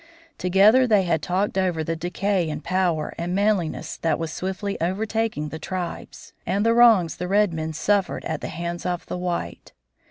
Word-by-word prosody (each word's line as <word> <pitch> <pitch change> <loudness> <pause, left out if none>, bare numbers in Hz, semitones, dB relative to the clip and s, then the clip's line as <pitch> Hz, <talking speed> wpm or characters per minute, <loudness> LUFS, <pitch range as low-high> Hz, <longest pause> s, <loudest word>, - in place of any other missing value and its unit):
Together 205 +8 +5
they 210 -4 +4
had 170 -3 0
talked 190 +3 0
over 180 -4 0
the 165 +1 -2
decay 180 +1 -1
in 150 -1 -4
power 175 -3 -1
and 175 +2 -2
manliness 200 -5 0
that 160 -3 0
was 165 -1 -4
swiftly 190 +2 -3
overtaking 210 -2 -1
the 160 - -7
tribes, 180 +1 -6
and 200 +4 0
the 230 - +4
wrongs 220 -9 +5
the 180 - -4
red 200 -1 +2
men 160 0 -3
suffered 195 +5 0
at 160 -2 -3
the - - -4
hands 170 0 -5
of 180 -1 -3
the - - -5
white. 175 - -4
180 Hz, 180 wpm, -23 LUFS, 165-200 Hz, -, Together